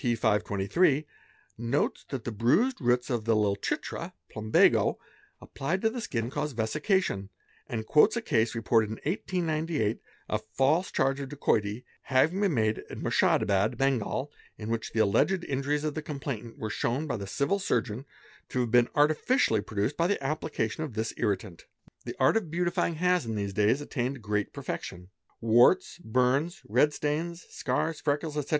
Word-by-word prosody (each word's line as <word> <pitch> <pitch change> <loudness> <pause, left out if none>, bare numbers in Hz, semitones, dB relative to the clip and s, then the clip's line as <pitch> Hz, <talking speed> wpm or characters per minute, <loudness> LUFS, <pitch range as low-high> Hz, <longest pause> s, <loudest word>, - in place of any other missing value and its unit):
523, 115 - +1 0.5
notes 120 +4 0
that 130 -4 -4
the 120 - -4
bruised 150 - +2
roots 125 +1 +1
of 115 -3 -1
the 115 -1 +3
Lal 105 -2 +2
Chitra - - -4 0.2
(Plambago) 110 0 +3 0.4
applied 160 +8 -3
to 220 - +3
the 245 0 -5
skin 120 - -3
cause 150 +1 -2
vesication 120 - 0 0.4
and 110 -2 -4
quotes 165 - +4
a - - -1
case 115 - +1
reported 115 -1 +2
in 110 - -4
1898 160 - -1 0.3
of 110 - -1
a 110 - -34
false 155 +7 +3
charge 135 +1 +1
of 140 -1 -5
dacoity 110 -5 0 0.2
having 150 +9 +2
been 200 -5 +2
made 110 -1 +1
at - - -7
Murshedabad, 105 +4 +2
Bengal, 135 +1 0 0.3
in 105 0 -6
which 115 -1 -2
the 110 - +2
alleged 150 - +2
injuries 145 +1 -1
of 155 -1 -1
the 155 - -4
complainant 135 -6 -6
were 110 -1 -4
shown 130 +7 -1
by 145 - -2
the 100 -3 -5
Civil 140 - 0
Surgeon 125 - -1 0.4
to 125 - 0
have 120 -2 -2
been 120 -1 +5
artificially 150 - +3
produced 105 +7 -2
by 170 - +2
the 205 -7 -1
application 150 -3 -2
of 140 -8 -6
this 110 +1 -2
irritant.; 100 -5 -2 0.4
The - - -5
art - - +4
of 200 -8 -3
beautifying 175 0 0
has 180 -4 +1
in 110 - -2
these 100 -1 -3
days 105 +7 +2
attained 130 -3 -3
great 105 -1 -1
perfection: 90 +2 -6 0.3
warts, 120 +13 +4
burns, 130 +5 0
red 130 +8 +3
stains, 165 +4 -3
scars, 155 +4 -2
freckles, 150 +1 -1
etc. 150 -2 -3
130 Hz, 165 wpm, -28 LUFS, 110-155 Hz, 0.5 s, been